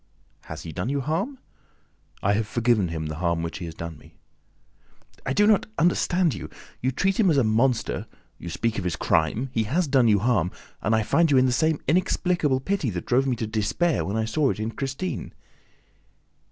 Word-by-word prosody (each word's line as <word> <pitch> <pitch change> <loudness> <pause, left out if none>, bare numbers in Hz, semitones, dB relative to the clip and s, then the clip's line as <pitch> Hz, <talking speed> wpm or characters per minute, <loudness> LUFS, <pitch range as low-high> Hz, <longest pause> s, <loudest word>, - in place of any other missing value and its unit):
"Has 80 +2 -7
he 80 - -6
done 90 +8 -3
you 140 0 0
harm?" 185 - -2 0.9
"I 100 - +3
have 105 +1 0
forgiven 115 -4 +2
him 80 -1 -4
the 75 0 -5
harm 85 -1 0
which 85 - -5
he 90 - -5
has 80 -1 -8
done 85 -2 -7
me." - - -19 1.1
"I 130 - +1
do 205 - +4
not 210 -1 +3
understand 175 -1 +2
you. - - -7 0.3
You 130 - +1
treat 195 - 0
him 200 -5 +5
as 155 - +3
a 135 - +4
monster, 115 +3 +1 0.3
you 85 - -7
speak 115 +6 -1
of - - -4
his 90 -3 -1
crime, 105 - 0
he 115 -2 +1
has 160 +10 0
done 130 -4 +4
you 105 -2 +5
harm 100 -5 +1 0.3
and 110 +2 +2
I 110 - +2
find 165 +9 +3
in 140 - +4
you 130 - +6
the 130 - +2
same 155 +4 +1
inexplicable 175 -4 +1
pity 190 -4 -1
that 90 -4 -4
drove 130 +2 +2
me 130 - +1
to 110 - -3
despair 110 +10 0
when 100 +3 -2
I 110 - 0
saw 135 +5 +1
it - - -2
in 110 +1 -2
Christine!" 135 +5 -4
120 Hz, 205 wpm, -25 LUFS, 100-155 Hz, 1.1 s, you